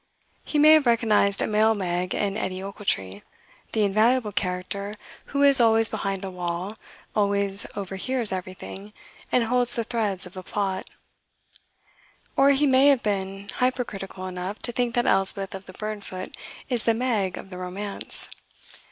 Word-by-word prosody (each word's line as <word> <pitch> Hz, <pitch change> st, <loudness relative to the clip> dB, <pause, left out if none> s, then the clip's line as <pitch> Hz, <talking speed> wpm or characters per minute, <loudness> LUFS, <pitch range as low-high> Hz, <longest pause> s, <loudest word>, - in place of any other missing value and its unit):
He 300 Hz, -, -2 dB
may 305 Hz, +1 st, +8 dB
have 310 Hz, -4 st, +6 dB
recognized 215 Hz, -4 st, +3 dB
a -, -, +2 dB
male 220 Hz, +1 st, +3 dB
Meg 180 Hz, -2 st, -2 dB
in 200 Hz, -1 st, -1 dB
Edie 190 Hz, -3 st, -3 dB
Ochiltree, 105 Hz, -, -2 dB, 0.5 s
the 220 Hz, -, +2 dB
invaluable 215 Hz, +3 st, +3 dB
character 200 Hz, +2 st, -3 dB, 0.3 s
who 280 Hz, 0 st, 0 dB
is 275 Hz, -3 st, +7 dB
always 225 Hz, -1 st, +5 dB
behind 195 Hz, -2 st, -3 dB
a 190 Hz, -, -5 dB
wall, 180 Hz, +3 st, -4 dB, 0.4 s
always 200 Hz, -1 st, +2 dB
overhears 205 Hz, +5 st, -2 dB
everything, 190 Hz, +2 st, -6 dB, 0.4 s
and 250 Hz, -, +3 dB
holds 245 Hz, +1 st, +2 dB
the 230 Hz, -, 0 dB
threads 210 Hz, -5 st, -2 dB
of 180 Hz, -, -11 dB
the 185 Hz, -, -7 dB
plot. 190 Hz, 0 st, -2 dB, 1.5 s
Or 275 Hz, +1 st, +5 dB
he 280 Hz, +1 st, +4 dB
may 265 Hz, 0 st, +5 dB
have 275 Hz, -4 st, +4 dB
been 195 Hz, -1 st, -2 dB
hypercritical 215 Hz, -7 st, -2 dB
enough 185 Hz, +2 st, -4 dB
to 240 Hz, -, 0 dB
think 240 Hz, -1 st, -1 dB
that 240 Hz, -, +2 dB
Elspeth 195 Hz, 0 st, +1 dB
of 190 Hz, 0 st, -8 dB
the 185 Hz, -, -10 dB
Burnfoot 205 Hz, -3 st, -6 dB, 0.3 s
is 245 Hz, -4 st, -2 dB
the 230 Hz, -, +3 dB
Meg 220 Hz, -7 st, 0 dB
of 195 Hz, -, -10 dB
the 180 Hz, -, -7 dB
romance. 195 Hz, +3 st, -3 dB
205 Hz, 155 wpm, -25 LUFS, 190-235 Hz, 1.5 s, may